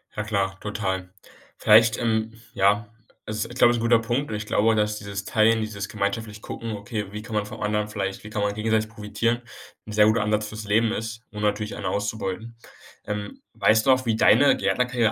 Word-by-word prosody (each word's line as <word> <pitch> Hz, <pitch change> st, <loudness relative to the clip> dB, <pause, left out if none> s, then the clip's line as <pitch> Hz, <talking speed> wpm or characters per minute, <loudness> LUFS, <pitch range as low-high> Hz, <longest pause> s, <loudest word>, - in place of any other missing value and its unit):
Ja 105 Hz, -, -2 dB
klar, 100 Hz, -2 st, -1 dB
total. 95 Hz, -3 st, -3 dB, 0.5 s
Vielleicht, 110 Hz, +1 st, +5 dB
ähm, 110 Hz, -1 st, 0 dB, 0.2 s
ja 105 Hz, +1 st, +2 dB, 0.4 s
also 110 Hz, 0 st, -3 dB
ist, 120 Hz, -, -10 dB
glaube 120 Hz, -, +6 dB
ich, 120 Hz, -, -1 dB
'n -, -, -4 dB
guter 115 Hz, 0 st, +4 dB
Punkt 120 Hz, +5 st, -2 dB
und 110 Hz, -, -3 dB
ich 105 Hz, -, -5 dB
glaube, 110 Hz, +1 st, +2 dB
dass 105 Hz, 0 st, 0 dB
dieses 100 Hz, -1 st, -5 dB
Teilen, 110 Hz, +2 st, +3 dB
dieses 100 Hz, -3 st, -4 dB
gemeinschaftlich 105 Hz, +1 st, -3 dB
Gucken, 115 Hz, -1 st, -6 dB
okay, 105 Hz, +1 st, -4 dB
wie 105 Hz, -, -5 dB
kann 110 Hz, +1 st, -9 dB
man 105 Hz, -1 st, 0 dB
vom 110 Hz, +1 st, -9 dB
anderen 105 Hz, 0 st, 0 dB
vielleicht 95 Hz, -2 st, -4 dB
wie -, -, -7 dB
kann 105 Hz, -1 st, -3 dB
man 100 Hz, 0 st, 0 dB
gegenseitig 110 Hz, +1 st, 0 dB
profitieren, 115 Hz, +2 st, -2 dB, 0.5 s
'n -, -, -7 dB
sehr 105 Hz, 0 st, +5 dB
guter 110 Hz, +1 st, +3 dB
Ansatz 105 Hz, 0 st, 0 dB
fürs 110 Hz, 0 st, -7 dB
Leben 110 Hz, +2 st, +2 dB
ist, 115 Hz, 0 st, -4 dB
ohne 105 Hz, 0 st, -6 dB
natürlich 105 Hz, +1 st, -1 dB
einen -, -, -6 dB
auszubeuten. 105 Hz, +2 st, -3 dB, 0.5 s
Ähm, 105 Hz, -1 st, -5 dB
weißt 110 Hz, 0 st, +3 dB
du -, -, +7 dB
noch, 130 Hz, 0 st, +2 dB
wie 115 Hz, -2 st, +1 dB
deine 130 Hz, +6 st, +6 dB
Gärtnerkarriere 125 Hz, -3 st, +1 dB
110 Hz, 205 wpm, -24 LUFS, 105-115 Hz, 0.5 s, du